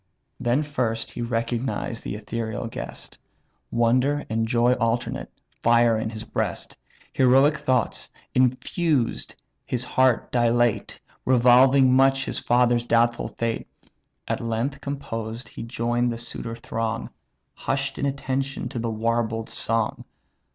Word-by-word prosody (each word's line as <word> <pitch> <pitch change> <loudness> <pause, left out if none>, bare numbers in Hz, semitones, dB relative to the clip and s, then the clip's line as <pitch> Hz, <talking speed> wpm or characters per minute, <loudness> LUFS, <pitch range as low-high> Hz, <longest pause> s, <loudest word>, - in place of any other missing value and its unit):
Then 125 +4 +1
first 120 -6 -2
he - - -6
recognized 115 0 -2
the - - -4
ethereal 110 +1 -4
guest; 115 - -7 0.5
Wonder 125 +5 +2
and 115 0 0
joy 120 +1 +3
alternate 115 -1 -1 0.3
fire 115 -1 +4
his 110 0 -4
breast; - - -3 0.4
Heroic 135 +4 +5
thoughts, 130 -5 0 0.2
infused, 130 +2 +1 0.3
his 125 -1 -2
heart 130 -2 +2
dilate; 120 -1 +1 0.2
Revolving 130 +1 +5
much 135 +1 +4
his - - -2
father's 120 -1 +2
doubtful 120 0 +2
fate. 115 -1 -3 0.6
At - - -1
length, 115 +5 -2
composed, 115 -5 -5
he - - -9
join'd 120 +1 0
the 115 - -4
suitor 115 0 -5
throng; 115 0 -3 0.4
Hush'd 135 0 -2
in 140 - +1
attention 135 0 -2
to 120 - -4
the 115 0 -2
warbled 115 0 -1
song. 115 -1 -1
120 Hz, 120 wpm, -24 LUFS, 115-130 Hz, 0.6 s, Heroic